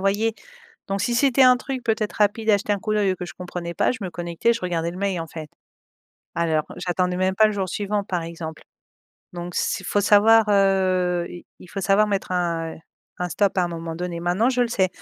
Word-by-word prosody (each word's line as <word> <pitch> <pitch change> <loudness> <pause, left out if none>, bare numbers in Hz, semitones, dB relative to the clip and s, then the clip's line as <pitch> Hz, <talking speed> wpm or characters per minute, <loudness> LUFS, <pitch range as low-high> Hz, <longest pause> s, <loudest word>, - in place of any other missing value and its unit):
voyais. 205 +3 +1 0.5
Donc 195 0 -1
si 235 +4 0
c'était 270 +1 +4
un 250 -1 +7
truc 260 0 -5
peut-être 220 -2 -1
rapide 215 +2 +2
à 205 - +6
jeter 205 +1 -2
un 205 - 0
coup 215 +2 -3
d'oeil 200 -3 +2
ou - - -5
que 180 - -6
je - - -10
comprenais 175 -1 -6
pas, - - +2
je 240 - -7
me 185 - -4
connectais, 175 +6 0
je 230 - -4
regardais 170 -2 -1
le 175 - -9
mail, 195 -3 -1
en 165 - -5
fait. 155 -2 -8 0.8
Alors 160 -2 +1
j'attendais 180 0 -1
même 185 0 +1
pas 215 - +6
le 215 - -1
jour 195 -2 -2
suivant, 205 +1 -2
par 175 -3 -2
exemple, 165 -1 -7 0.7
donc 175 0 -6
s - - -1
faut 205 - +1
savoir, 210 +2 +5
heu, 185 -3 +2 0.3
il - - -13
faut 200 - -4
savoir 195 +2 +3
mettre 195 -2 -2
un 170 -2 -1 0.4
un 180 - -2
stop 195 +3 +1
à - - +4
un - - -2
moment 165 -1 -5
donné 175 -1 -4
maintenant 180 +8 +2
je 250 -1 0
le - - +2
sais, 190 -5 +1
190 Hz, 225 wpm, -23 LUFS, 175-210 Hz, 0.8 s, un